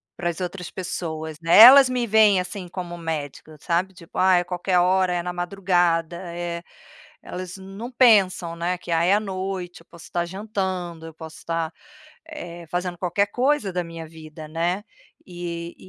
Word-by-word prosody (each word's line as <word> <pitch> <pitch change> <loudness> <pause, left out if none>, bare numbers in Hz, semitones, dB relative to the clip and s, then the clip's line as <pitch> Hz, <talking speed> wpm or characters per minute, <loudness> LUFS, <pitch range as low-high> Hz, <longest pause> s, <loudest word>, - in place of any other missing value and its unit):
para 175 -1 -2
as 170 - -5
outras 180 0 -5
pessoas, 160 -4 -5
né. 165 +3 +4
Elas 255 +4 +10
me 250 -1 0
veem 210 -3 +5
assim 180 0 -5
como 175 -1 -6
médica, 155 -1 -5
sabe? 180 +2 -1
Tipo, 170 -3 -9
ai, 185 -1 +5
a - - -7
qualquer 180 0 -1
hora, 185 0 +3
é 175 -1 -1
na 180 0 -4
madrugada, 175 -2 0 0.2
eh, 170 -1 -4 0.6
elas 180 +1 -7
não 195 +6 -8
pensam, 195 -9 +4
né, 175 +2 -2
que 175 - -8
ai 165 +2 +2
é - - +6
a - - +2
noite, 190 -3 -5
eu - - -22
posso 170 -2 -13
estar 175 -1 -2
jantando, 185 -3 -4
eu 160 - -10
posso 160 -1 -10
estar, 165 -1 -3 0.5
eh, 175 - -8
fazendo 175 0 -2
qualquer 185 +3 0
coisa 250 -3 0
da 180 -1 -1
minha 165 -1 -8
vida, 155 -1 -11
né. 170 +5 -1 0.4
E 170 -1 -6
175 Hz, 175 wpm, -23 LUFS, 170-190 Hz, 0.6 s, Elas